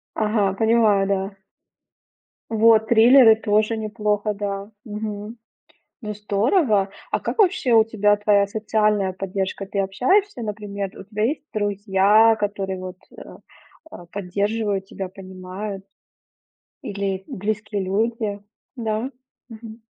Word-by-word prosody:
Ага, 210 Hz, -3 st, +1 dB
понимаю, 220 Hz, -3 st, +3 dB
да. 195 Hz, 0 st, -2 dB, 1.1 s
Вот, 220 Hz, 0 st, +4 dB
триллеры 235 Hz, 0 st, +7 dB
тоже 215 Hz, +1 st, +1 dB
неплохо, 210 Hz, -1 st, -1 dB
да. 200 Hz, 0 st, -5 dB
Мгм. 210 Hz, 0 st, -6 dB, 0.6 s
Ну 210 Hz, -2 st, -5 dB
здорово. 210 Hz, -, +1 dB, 0.2 s
А -, -, +1 dB
как -, -, -4 dB
вообще 345 Hz, -, +3 dB
у 225 Hz, -1 st, +7 dB
тебя 210 Hz, -2 st, +2 dB
твоя 205 Hz, -1 st, +2 dB
социальная 210 Hz, -2 st, 0 dB
поддержка? 190 Hz, +1 st, -4 dB
Ты 200 Hz, +1 st, -4 dB
общаешься, 250 Hz, -, +1 dB
например, 205 Hz, -2 st, -5 dB
у -, -, -9 dB
тебя 210 Hz, +1 st, -4 dB
есть 285 Hz, +4 st, -2 dB
друзья, 205 Hz, +1 st, +3 dB
которые 195 Hz, -2 st, -3 dB
вот, 185 Hz, 0 st, -7 dB, 0.2 s
э, -, -, -11 dB, 0.5 s
а, 175 Hz, -, -10 dB
поддерживают 200 Hz, +2 st, -2 dB
тебя, 190 Hz, -1 st, -6 dB
понимают 190 Hz, +1 st, -8 dB, 1.0 s
или 195 Hz, -1 st, -3 dB
близкие 205 Hz, 0 st, -3 dB
люди? 210 Hz, +2 st, -1 dB, 0.4 s
Да. 225 Hz, +1 st, -2 dB, 0.4 s
Мгм. 225 Hz, -1 st, -11 dB
210 Hz, 115 wpm, -22 LUFS, 195-220 Hz, 1.1 s, триллеры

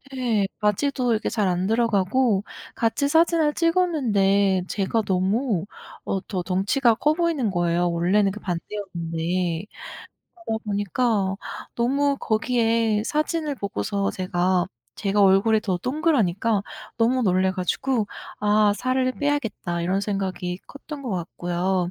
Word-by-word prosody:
예. 225 Hz, -6 st, +1 dB
바지도 245 Hz, +4 st, +1 dB
이렇게 220 Hz, -, -1 dB
잘 210 Hz, -4 st, 0 dB
안 180 Hz, +1 st, 0 dB
들어가고 225 Hz, -1 st, +2 dB, 0.3 s
같이 235 Hz, +5 st, +1 dB
사진을 325 Hz, -1 st, +3 dB
찍었는데 210 Hz, -, +2 dB
제가 210 Hz, +3 st, 0 dB
너무 195 Hz, +1 st, +1 dB, 0.4 s
어 195 Hz, -, -1 dB
더 185 Hz, -4 st, -3 dB
덩치가 205 Hz, +7 st, +2 dB
커 300 Hz, +6 st, +2 dB
보이는 320 Hz, -, 0 dB
거예요, 175 Hz, 0 st, +1 dB
원래는 190 Hz, +4 st, +2 dB
그 210 Hz, -, -8 dB
반대였는데. 175 Hz, -2 st, -3 dB, 0.8 s
그러다 220 Hz, 0 st, -2 dB
보니까 205 Hz, 0 st, 0 dB, 0.4 s
너무 275 Hz, +4 st, +1 dB
거기에 225 Hz, -1 st, +1 dB
사진을 305 Hz, 0 st, -1 dB
보고서 200 Hz, -1 st, -2 dB
제가, 180 Hz, -1 st, 0 dB, 0.3 s
제가 205 Hz, 0 st, 0 dB
얼굴이 200 Hz, +3 st, +4 dB
더 190 Hz, -4 st, -1 dB
동그라니까 230 Hz, -, +1 dB, 0.3 s
너무 245 Hz, +3 st, +2 dB
놀라 185 Hz, -2 st, +2 dB
가지고 210 Hz, +5 st, -1 dB, 0.3 s
'아. 210 Hz, 0 st, +4 dB
살을 255 Hz, 0 st, 0 dB
빼야겠다.' 225 Hz, -, -2 dB
이런 185 Hz, +3 st, 0 dB
생각이 190 Hz, -3 st, -3 dB
컸던 285 Hz, 0 st, -9 dB
것 245 Hz, -, -4 dB
같고요. 180 Hz, 0 st, -1 dB
210 Hz, 280 characters per minute, -24 LUFS, 185-250 Hz, 0.8 s, 얼굴이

